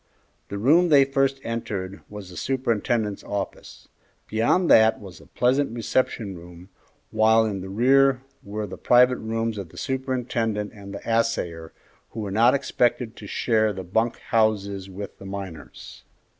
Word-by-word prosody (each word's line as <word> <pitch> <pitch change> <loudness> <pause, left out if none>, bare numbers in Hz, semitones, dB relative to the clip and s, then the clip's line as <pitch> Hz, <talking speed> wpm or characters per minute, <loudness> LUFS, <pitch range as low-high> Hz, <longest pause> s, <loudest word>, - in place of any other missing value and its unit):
The 100 - -4
room 160 - +4
they 140 -3 +6
first 135 0 0
entered 100 -4 -4
was 105 -3 -9
the - - -11
superintendent's 115 -2 -1
office. 100 -2 -6 0.4
Beyond 115 +12 +2
that 110 0 +6
was 95 -4 -12
a - - -17
pleasant 125 +1 +1
reception 115 -3 -1
room, 85 +2 -13 0.4
while 110 +1 +4
in 100 -3 -3
the 95 - -7
rear 130 +5 +3 0.2
were 105 +1 -4
the 95 - -9
private 125 +1 +5
rooms 115 -1 -2
of 95 -4 -7
the - - -16
superintendent 120 -5 -2
and 100 -2 -11
the 100 - -9
assayer, 90 -8 -1 0.4
who 110 - -5
were 100 -2 -4
not 115 +6 +4
expected 125 -3 0
to 105 - -9
share 110 0 +1
the 95 -1 -6
bunk 110 +6 0
houses 100 -3 0
with 100 +1 -8
the 95 - -11
miners. 95 -5 -9
110 Hz, 155 wpm, -24 LUFS, 100-125 Hz, 0.4 s, they